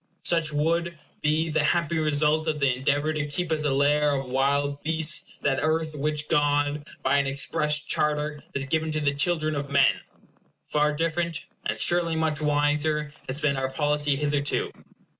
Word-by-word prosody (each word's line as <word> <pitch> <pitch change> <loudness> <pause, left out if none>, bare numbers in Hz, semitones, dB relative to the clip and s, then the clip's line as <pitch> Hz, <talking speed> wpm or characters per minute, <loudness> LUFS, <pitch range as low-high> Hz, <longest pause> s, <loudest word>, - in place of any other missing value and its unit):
Such 165 -3 +2
would 170 +3 0 0.2
be 155 +2 +1
the 155 0 +1
happy 170 0 +1
result 155 +1 +2
of 155 -1 0
the 140 -3 +2
endeavor 145 +4 0
to 150 -1 -2
keep 165 +3 -3
as 155 -1 0
a 145 - +2
lair 145 +2 +2
of 135 -2 -4
wild 140 +2 0
beasts 160 0 -1
that 135 -2 +1
earth 155 0 0
which 150 +1 -1
God, 145 0 +1 0.2
by 130 +2 +3
an 140 -1 +1
express 150 +2 +1
charter, 150 0 -1
has 135 -1 0
given 160 +3 -1
to 155 - 0
the 145 -2 +1
children 155 +1 +1
of 140 -1 -4
men. 140 -1 +3 0.6
Far 150 0 +1
different, 165 +1 -2 0.2
and - - -2
surely 175 -1 +2
much 160 -1 0
wiser, 150 0 +1 0.2
has 135 +3 -2
been 150 -3 +1
our 130 0 -1
policy 145 0 0
hitherto. 145 0 -1
150 Hz, 170 wpm, -25 LUFS, 145-155 Hz, 0.6 s, by